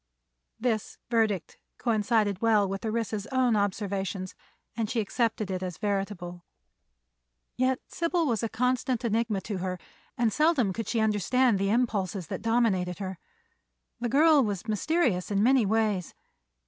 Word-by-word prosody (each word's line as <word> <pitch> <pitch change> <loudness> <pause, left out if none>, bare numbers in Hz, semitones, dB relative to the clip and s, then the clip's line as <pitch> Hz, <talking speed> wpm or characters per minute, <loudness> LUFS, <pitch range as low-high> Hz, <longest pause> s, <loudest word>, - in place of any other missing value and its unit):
This 225 -3 -1
verdict 220 -6 0 0.2
coincided 215 -4 +1
well 215 -3 +4
with 195 +1 -4
Orissa's 220 -1 -2
own 255 -3 +2
observations 195 -2 -2 0.4
and 225 -2 -2
she 235 - 0
accepted 220 -1 -1
it 185 -1 -2
as 180 -3 -4
veritable. 195 -4 -3 1.1
Yet 255 0 +1
Sybil 335 0 0
was 235 -6 0
a 230 - -1
constant 250 0 0
enigma 220 -2 0
to 200 0 -4
her 185 0 -3 0.4
and 230 -3 +2
seldom 300 - +2
could 225 +3 -4
she 230 - 0
understand 220 +2 +2
the 195 0 +1
impulses 205 -5 0
that - - -4
dominated 215 -6 +1
her. 190 -3 -5 0.8
The 240 0 -1
girl 300 +2 +5
was 205 -1 -3
mysterious 215 - +1
in 200 0 +1
many 250 -3 +4
ways. 210 -4 0
215 Hz, 140 wpm, -28 LUFS, 195-240 Hz, 1.1 s, girl